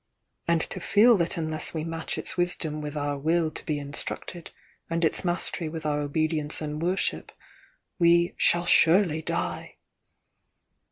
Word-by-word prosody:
"And 170 -1 +3
to - - -4
feel 225 +4 +5
that 170 -1 -1
unless 155 0 -3
we 155 - -2
match 165 0 -4
its - - -1
wisdom 165 -4 -1
with 150 0 -5
our 145 -1 -2
will 160 +2 +1
to - - -7
be 150 - -2
instructed, 145 +4 -6 0.4
and 165 0 +1
its 160 - +1
mastery 175 -2 -2
with 160 0 -7
our 150 -1 0
obedience 150 +1 -1
and 150 0 -4
worship, 180 +3 -1 0.7
we 170 0 +4
'shall 175 0 +2
surely 170 -2 +4
die'!" - - -3
160 Hz, 150 wpm, -26 LUFS, 150-170 Hz, 0.7 s, feel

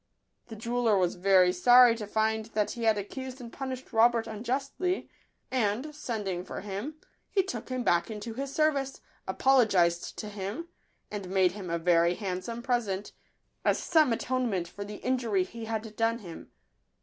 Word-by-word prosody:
The 225 - -8
jeweller 230 -1 +1
was 180 -2 +2
very 185 -1 +4
sorry 245 +5 +7
to 210 -2 -6
find 220 +1 0
that 210 -1 +1
he 235 -1 -4
had 220 -1 +4
accused 260 +6 -6
and 235 -2 -9
punished 260 -2 -6
Robert 230 0 +4
unjustly; 265 - -2 0.4
and, 250 +4 0
sending 210 -10 -3
for - - -6
him, 205 +9 -5 0.3
he 390 - +2
took 250 - -6
him 255 -1 -2
back 175 -1 +2
into 220 +1 -6
his 270 +3 -4
service, 275 -3 0 0.3
apologised 195 -10 +3
to 210 - -5
him, 210 - -5 0.4
and 200 -3 -5
made 190 -1 +3
him 190 -2 -7
a 170 - 0
very 170 +1 +3
hand 185 -3 -3
some 235 +3 -6
present, 220 -6 -1 0.5
as - - +3
some 315 -6 +3
atonement 230 -7 -1
for 200 +3 -7
the 205 +1 -7
in 255 0 +2
jury 210 -6 +1
he 225 +4 -8
had 220 -1 -4
done 225 +1 +1
him. 175 -8 -10
220 Hz, 170 wpm, -29 LUFS, 195-250 Hz, 0.5 s, sorry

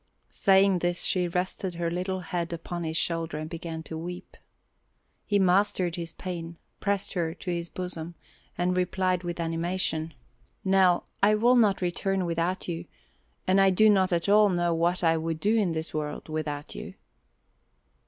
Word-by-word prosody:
Saying 195 -2 +4
this 175 0 0
she 180 -1 +1
rested 180 +1 -2
her 170 0 -2
little 185 +2 -2
head 170 -1 -3
upon 170 +1 -5
his 160 0 -2
shoulder 165 -2 -1
and 155 0 -4
began 165 -1 -6
to 160 - -7
weep. 180 +3 -7 0.9
He 205 - +3
mastered 185 -2 +2
his 170 -2 -4
pain, 170 -2 -6 0.2
pressed 200 -1 -1
her 165 -3 -1
to 180 +1 -5
his 170 -1 -3
bosom, 175 -2 -6 0.4
and 180 +1 +1
replied 185 0 +1
with 175 -1 -5
animation: 165 -1 -1 0.5
"Nell, 190 -2 +4 0.2
I 210 +1 +5
will 240 +4 +4
not 210 -6 +3
return 190 +1 0
without 170 +2 -1
you 170 -1 -4 0.6
and 190 +1 +4
I 195 - +6
do 215 +3 +5
not 190 -2 +3
at 170 +1 0
all 210 +1 +6
know 175 -2 +1
what 170 +2 +1
I 165 -1 +4
would 160 0 -3
do 210 +7 +2
in 200 -7 +2
this 160 0 -4
world 150 0 -4
without 150 -2 -4
you." - - -8
175 Hz, 165 wpm, -27 LUFS, 165-190 Hz, 0.9 s, I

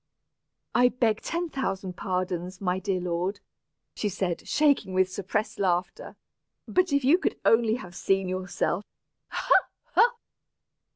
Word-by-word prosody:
"I 245 0 +5
beg 230 -4 +1
ten 340 0 -2
thousand 195 -8 -3
pardons, 180 -1 -3
my 185 -1 0
dear 190 0 -1
lord," 180 +3 -2 0.5
she 210 - -2
said, 185 -3 -3
shaking 285 -11 +2
with 185 0 +3
suppressed 210 +4 -2
laughter. 185 - -1 0.5
"But 365 -3 +2
if 280 -2 +2
you 320 +7 +5
could - - -1
only 225 -1 +4
have 180 -7 -8
seen 195 +1 +1
yourself! 185 0 -1 0.4
Ha, - - +1 0.4
ha! 480 +1 +5
195 Hz, 130 wpm, -27 LUFS, 185-245 Hz, 0.5 s, I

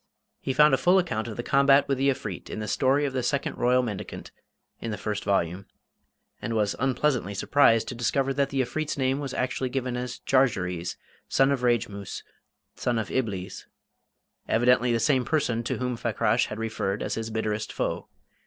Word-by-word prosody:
He 135 - -2
found 150 +2 +5
a 135 - +3
full 180 +2 +4
account 120 -12 0
of 110 - -7
the 120 - -3
combat 140 +1 +4
with 135 -2 0
the 135 +1 +3
Efreet 105 -8 -4
in - - -5
"The 105 0 -4
Story 135 +5 +2
of 135 - -2
the 130 - 0
Second 140 +2 -2
Royal 125 +1 +3
Mendicant" 105 -5 -6 0.5
in 115 - -5
the 105 - -3
first 105 0 -3
volume, 95 -1 0 0.7
and 115 - -3
was 105 -2 +1
unpleasantly 130 -5 0
surprised 115 0 +3
to - - -4
discover 135 +3 0
that 140 0 +1
the 135 -1 0
Efreet's 145 +6 -3
name 135 0 +1
was 140 -2 -4
actually 130 0 -1
given 125 -1 -2
as 125 -1 -4
"Jarjarees, 90 -10 +1
the - - -13
son 135 +1 +5
of 135 -3 0
Rejmoos, 105 -5 -1 0.5
the - - -16
son 120 -1 +1
of 110 -2 -2
Iblees" 105 -8 -3 0.8
evidently 125 +2 +3
the 115 - +2
same 130 +3 +2
person 125 -4 0
to - - -1
whom 125 -1 -2
Fakrash 115 0 +1
had 105 - -6
referred 110 -3 -2
as - - -2
his 115 0 -3
bitterest 110 -1 -2
foe. - - -3
125 Hz, 190 wpm, -26 LUFS, 110-135 Hz, 0.8 s, found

